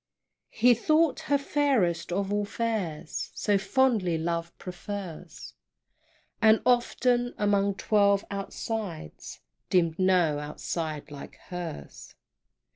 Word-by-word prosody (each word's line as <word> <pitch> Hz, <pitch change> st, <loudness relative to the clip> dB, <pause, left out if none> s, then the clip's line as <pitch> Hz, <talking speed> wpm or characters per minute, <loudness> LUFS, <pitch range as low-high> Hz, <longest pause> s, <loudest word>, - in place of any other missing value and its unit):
He 245 Hz, +2 st, +4 dB
thought 310 Hz, +6 st, +2 dB
her 285 Hz, -, +4 dB
fairest 260 Hz, -, +1 dB
of 195 Hz, +2 st, -1 dB
all 205 Hz, 0 st, +1 dB
fares, 200 Hz, -8 st, -3 dB
So 205 Hz, -2 st, +1 dB
fondly 210 Hz, -6 st, +2 dB
love 170 Hz, +1 st, -2 dB
prefers; 180 Hz, -3 st, -8 dB, 0.9 s
And 220 Hz, -1 st, +6 dB
often, 245 Hz, 0 st, +2 dB
among 200 Hz, -1 st, +2 dB
twelve 200 Hz, -1 st, +2 dB
outsides, 200 Hz, -, -5 dB, 0.3 s
Deemed 170 Hz, -2 st, +2 dB
no 180 Hz, -5 st, +3 dB
outside 150 Hz, 0 st, -5 dB
like 140 Hz, -1 st, -9 dB
hers! 70 Hz, -, -8 dB
195 Hz, 100 wpm, -27 LUFS, 170-225 Hz, 0.9 s, And